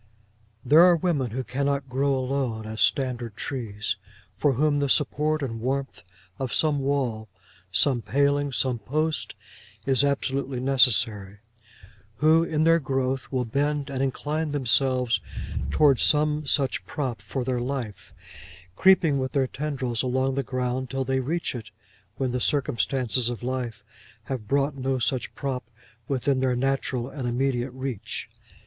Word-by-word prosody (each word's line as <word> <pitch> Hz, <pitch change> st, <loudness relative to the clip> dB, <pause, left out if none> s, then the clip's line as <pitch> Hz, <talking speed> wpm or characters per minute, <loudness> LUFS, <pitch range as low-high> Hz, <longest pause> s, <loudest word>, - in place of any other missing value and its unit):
There 155 Hz, +3 st, +7 dB
are 180 Hz, 0 st, +7 dB
women 155 Hz, -7 st, 0 dB
who 130 Hz, +4 st, -3 dB
cannot 140 Hz, +1 st, -1 dB
grow 135 Hz, +2 st, +1 dB
alone 130 Hz, -4 st, -2 dB
as 110 Hz, 0 st, -5 dB
standard 125 Hz, -5 st, 0 dB
trees; 105 Hz, -5 st, -3 dB, 0.4 s
for 145 Hz, -2 st, +2 dB
whom 145 Hz, +3 st, +2 dB
the 140 Hz, -1 st, 0 dB
support 150 Hz, +2 st, +1 dB
and 115 Hz, -4 st, -4 dB
warmth 135 Hz, +2 st, -2 dB, 0.4 s
of 130 Hz, -3 st, -2 dB
some 150 Hz, -2 st, +2 dB
wall, 130 Hz, -6 st, -1 dB, 0.4 s
some 120 Hz, +5 st, +3 dB
paling, 140 Hz, +5 st, +1 dB
some 125 Hz, -2 st, 0 dB
post, 155 Hz, +8 st, -1 dB, 0.5 s
is 135 Hz, 0 st, +4 dB
absolutely 140 Hz, -2 st, -1 dB
necessary; 115 Hz, -6 st, +2 dB, 0.8 s
who, 155 Hz, +6 st, +4 dB
in 155 Hz, -2 st, 0 dB
their 165 Hz, +1 st, +5 dB
growth, 135 Hz, -2 st, -2 dB
will 130 Hz, -2 st, 0 dB
bend 145 Hz, +4 st, -1 dB
and 135 Hz, -1 st, -2 dB
incline 150 Hz, +4 st, -1 dB
themselves 125 Hz, -3 st, +2 dB, 0.5 s
towards 135 Hz, -, +4 dB
some 150 Hz, -1 st, +2 dB
such 135 Hz, -1 st, +1 dB
prop 130 Hz, -7 st, -3 dB
for 130 Hz, -, -3 dB
their 125 Hz, 0 st, -1 dB
life, 125 Hz, -5 st, -4 dB, 0.6 s
creeping 170 Hz, -, +4 dB
with 130 Hz, -1 st, -3 dB
their 135 Hz, -2 st, +2 dB
tendrils 130 Hz, -4 st, -2 dB
along 130 Hz, +1 st, 0 dB
the 140 Hz, -, 0 dB
ground 130 Hz, 0 st, -2 dB
till 135 Hz, +1 st, -1 dB
they 130 Hz, 0 st, +1 dB
reach 160 Hz, +7 st, -2 dB
it 115 Hz, -3 st, -7 dB, 0.5 s
when 130 Hz, -2 st, -1 dB
the 125 Hz, 0 st, -2 dB
circumstances 130 Hz, -3 st, 0 dB
of 120 Hz, 0 st, -5 dB
life 125 Hz, -2 st, -3 dB, 0.4 s
have 125 Hz, -6 st, -5 dB
brought 140 Hz, +1 st, +1 dB
no 135 Hz, 0 st, -1 dB
such 120 Hz, +1 st, -2 dB
prop 130 Hz, -5 st, -4 dB, 0.4 s
within 135 Hz, 0 st, +1 dB
their 130 Hz, -1 st, +1 dB
natural 130 Hz, -1 st, -1 dB
and 135 Hz, -3 st, -5 dB
immediate 125 Hz, +1 st, 0 dB
reach. 130 Hz, -3 st, -5 dB
130 Hz, 145 wpm, -26 LUFS, 125-140 Hz, 0.8 s, There